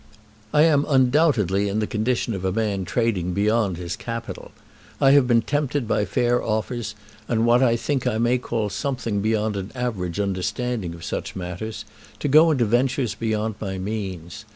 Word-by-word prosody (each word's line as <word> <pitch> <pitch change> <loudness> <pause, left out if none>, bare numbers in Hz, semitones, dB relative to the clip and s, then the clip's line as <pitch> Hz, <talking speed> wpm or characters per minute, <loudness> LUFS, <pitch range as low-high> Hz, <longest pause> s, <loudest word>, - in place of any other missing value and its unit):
I 150 - +5
am 150 -3 +3
undoubtedly 125 - +3
in 100 - -2
the 110 - +1
condition 115 +2 -1
of 95 -2 -5
a 95 - 0
man 100 -2 -1
trading 95 -6 0
beyond 105 -2 +1
his 85 -1 -4
capital. 115 -1 -6 0.5
I 135 - +5
have 140 -3 +5
been 115 -2 +3
tempted 145 -3 -1
by 105 - +1
fair 120 +5 +1
offers, 110 0 -2 0.3
and 115 -1 +1
what 120 +1 +4
I 120 -3 +4
think 130 +2 -1
I 115 -3 0
may 120 +2 +2
call 110 -4 -2
something 115 -3 -2
beyond 110 0 0
an 95 0 -5
average 105 -8 -3
understanding 100 0 -2
of 85 - -12
such - - -4
matters, 90 +5 -5 0.3
to - - -2
go 155 +4 +6
into 130 -7 +2
ventures 120 0 +1
beyond 110 0 -2
my 95 -3 -3
means. 95 -1 -5
110 Hz, 175 wpm, -23 LUFS, 100-125 Hz, 0.5 s, go